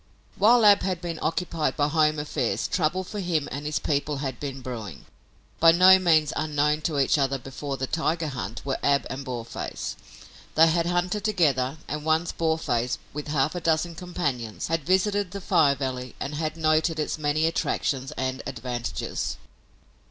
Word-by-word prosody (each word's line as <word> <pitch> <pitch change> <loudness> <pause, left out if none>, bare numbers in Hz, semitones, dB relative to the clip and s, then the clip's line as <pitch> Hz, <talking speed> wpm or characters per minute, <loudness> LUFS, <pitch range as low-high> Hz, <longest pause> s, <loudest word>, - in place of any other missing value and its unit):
While 225 +3 +5
Ab 205 -1 +7
had 185 -3 -1
been 170 -2 -5
occupied 160 -4 -1
by 145 - +2
home 155 0 +2
affairs 130 -8 -1
trouble 180 +2 0
for 205 +3 -6
him 170 -6 0
and 145 +3 -4
his 150 - -1
people 145 0 -1
had 135 -3 -4
been 135 -2 -5
brewing. 110 - -7 0.5
By 165 0 +7
no 185 +2 +7
means 160 -5 +3
unknown 150 0 +1
to 150 - -3
each 140 +2 +3
other 135 0 +1
before 135 +2 -6
the 130 - -2
tiger 160 +2 -1
hunt 115 -3 -6
were 135 -1 -1
Ab 140 0 +2
and 140 - -5
Boarface. 120 -3 -5 0.6
They 165 +1 +7
had 170 +1 +1
hunted 180 +3 0
together 150 -10 +1
and 150 0 -4
once 160 +2 +1
Boarface, 160 -7 0 0.2
with 150 +1 -5
half 145 0 +1
a 175 - -4
dozen 165 +1 +1
companions, 145 -11 -3
had 165 -2 0
visited 190 +3 +1
the 200 +2 -6
Fire 160 -7 +3
Valley 130 -2 -4
and 140 - -4
had 155 +1 -3
noted 155 0 +2
its 155 - -2
many 150 +1 +1
attractions 135 -4 -1
and 130 0 -3
advantages. 120 - -4
150 Hz, 170 wpm, -26 LUFS, 135-170 Hz, 0.6 s, Ab